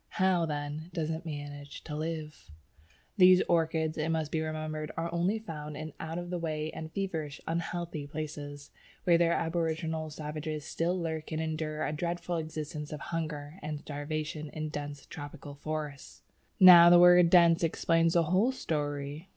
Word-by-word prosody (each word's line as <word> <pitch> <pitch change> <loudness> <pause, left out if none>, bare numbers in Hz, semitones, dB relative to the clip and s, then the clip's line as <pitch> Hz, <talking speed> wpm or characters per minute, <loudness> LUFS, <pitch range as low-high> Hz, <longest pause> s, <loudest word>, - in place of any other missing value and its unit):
How, 185 -4 +3
then, 150 +2 -4
does 160 -2 -1
it 165 +2 -5
manage 145 -1 -7
to 150 - -6
live? 155 - -5 0.7
These 185 -1 +7
orchids, 160 -1 +1
it 155 +1 0
must 160 -2 -1
be 160 - 0
remembered, 155 -1 -4
are 165 +1 -2
only 175 +5 +1
found 150 -8 -7
in 155 -1 -6
out 165 +1 -4
of 175 0 -5
the 180 - -2
way 155 -1 -2
and 160 0 -7
feverish, 160 -7 -3
unhealthy 170 -2 -3
places, 145 -1 -6 0.3
where 170 -2 +4
the 170 - +5
aboriginal 160 -1 -1
savages 150 0 -5
still 175 +3 -1
lurk 160 -2 -4
and 155 - -2
endure 155 -1 -2
a 150 - -2
dreadful 170 +2 -2
existence 155 -2 -5
of 150 - -5
hunger 155 0 -4
and 150 -1 -5
starvation 150 +1 -4
in 155 +1 -4
dense 145 -2 -6
tropical 145 -1 -9
forests. 150 -1 -6 0.4
Now 175 -2 +10
the 175 - +8
word 175 0 +7
"dense" 170 -2 +6
explains 165 0 +2
the 170 - +4
whole 185 +10 +2
story. 145 - -3
160 Hz, 160 wpm, -30 LUFS, 150-170 Hz, 0.7 s, Now